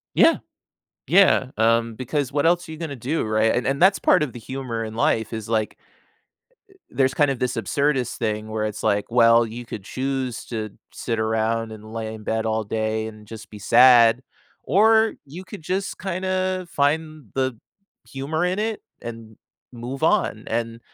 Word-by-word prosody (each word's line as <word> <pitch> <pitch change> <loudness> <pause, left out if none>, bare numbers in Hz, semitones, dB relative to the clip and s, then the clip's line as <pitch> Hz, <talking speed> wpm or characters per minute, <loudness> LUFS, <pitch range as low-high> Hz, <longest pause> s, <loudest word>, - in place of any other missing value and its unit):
Yeah. 330 - +5 0.7
Yeah. 185 -7 +5
Um, 115 +1 +2
because 135 +2 -2
what 145 +1 0
else 175 +1 +2
are - - -6
you 160 - -7
gonna 160 -4 -5
do, 135 +7 -2
right, 110 +1 +2
and 125 - -1
and 140 +4 -1
that's 195 +2 +6
part - - +3
of 145 -5 -1
the 120 - -9
humor 120 -1 -5
in 110 0 -6
life 115 -4 0
is 110 0 -5
like 110 -2 -1 0.9
uh, 390 - -21 0.2
there's 135 -1 +1
kind 145 -2 +3
of 135 - -2
this 125 0 -1
absurdist 130 +4 0
thing 110 -1 -2
where 110 0 -2
it's 105 -1 -4
like, 100 0 +1
well, 115 -1 +5
you 120 +2 -8
could 105 -4 -8
choose 130 -1 -3
to 110 -3 -4 0.2
sit 115 -2 -3
around 110 +1 0
and 110 0 -11
lay 110 -1 -4
in 105 -1 -11
bed 110 0 -1
all 110 0 0
day 110 +1 -2
and 110 -1 -11
just 110 -2 -10
be 105 - -10
sad 120 +2 +6 0.5
or 220 +3 +4
you 165 +7 -10
could 190 -3 -10
just 190 +4 -3
kinda 185 0 -2
find 155 -1 -1
the 130 -3 -1 0.5
humor 145 +5 -2
in 185 +3 0
it 220 0 -2 0.2
and 115 -2 -9 0.4
move 125 +3 -7
on, - - +1
and 115 0 -3
120 Hz, 180 wpm, -23 LUFS, 110-150 Hz, 0.9 s, that's